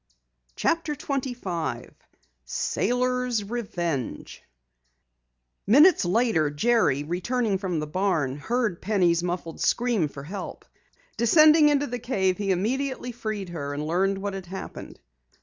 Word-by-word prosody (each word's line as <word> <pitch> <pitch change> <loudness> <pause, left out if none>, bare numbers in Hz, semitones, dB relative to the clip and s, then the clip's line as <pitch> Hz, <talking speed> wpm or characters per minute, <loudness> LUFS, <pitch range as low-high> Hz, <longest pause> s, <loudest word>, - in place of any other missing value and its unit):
CHAPTER 330 -2 0
25 245 - -4 0.5
SAILORS' 250 - 0
REVENGE 175 - -4 1.3
Minutes 290 - +6
later, 185 -5 +2
Jerry, 145 - +2
returning 195 +6 -1
from 180 -5 -2
the 150 - -2
barn, 155 -5 0
heard 220 +2 -1
Penny's 180 -5 +2
muffled 175 -2 -4
scream 235 -9 +1
for 140 -1 -10
help. 185 +5 -7 0.5
Descending 305 +5 +6
into 290 -1 +2
the 245 -2 -4
cave 190 -7 0
he 200 -1 -2
immediately 250 +7 -1
freed 215 -5 -5
her 145 -4 -5
and 150 +1 -3
learned 190 +5 +1
what 200 0 -4
had 190 -2 -7
happened. 190 +2 -8
200 Hz, 115 wpm, -25 LUFS, 170-245 Hz, 1.3 s, Minutes